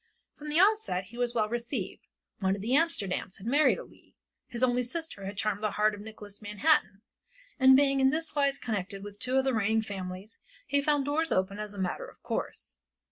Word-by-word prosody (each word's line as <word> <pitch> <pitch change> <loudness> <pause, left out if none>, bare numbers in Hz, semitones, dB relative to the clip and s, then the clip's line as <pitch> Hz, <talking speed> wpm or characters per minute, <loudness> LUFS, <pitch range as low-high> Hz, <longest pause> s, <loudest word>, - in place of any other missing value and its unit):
From 300 0 -8
the 305 +3 +3
onset 400 - +3
he 235 - -12
was 240 -1 0
well 215 -2 +2
received; 235 -3 -4 0.3
one 190 -1 +1
of 200 - -7
the 230 - -2
Amsterdams 265 - +1
had 195 - -12
married 285 +6 +4
a - - -7
Leigh, - - -21 0.3
his 240 +1 -4
only 250 -1 +3
sister 255 - -5
had 200 +1 -6
charmed 210 0 -1
the 215 -1 -1
heart 215 0 +3
of 205 - -8
Nicholas 210 -1 -11
Manhattan, 205 -2 +1 0.6
and 260 0 +8
being 275 -1 +3
in 265 0 +5
this 320 +3 -1
wise 280 -2 +2
connected 200 -3 -4
with 205 0 -9
two 255 +1 -1
of 265 - +4
the 265 - +2
reigning 220 0 +2
families, 190 +1 -7 0.3
he 285 0 +2
found 290 -1 +2
the 285 - -2
doors 320 +2 0
open 190 +2 0
as 210 -1 -5
a - - -7
matter 185 -1 -2
of - - -16
course. - - -4
225 Hz, 215 wpm, -29 LUFS, 200-280 Hz, 0.6 s, and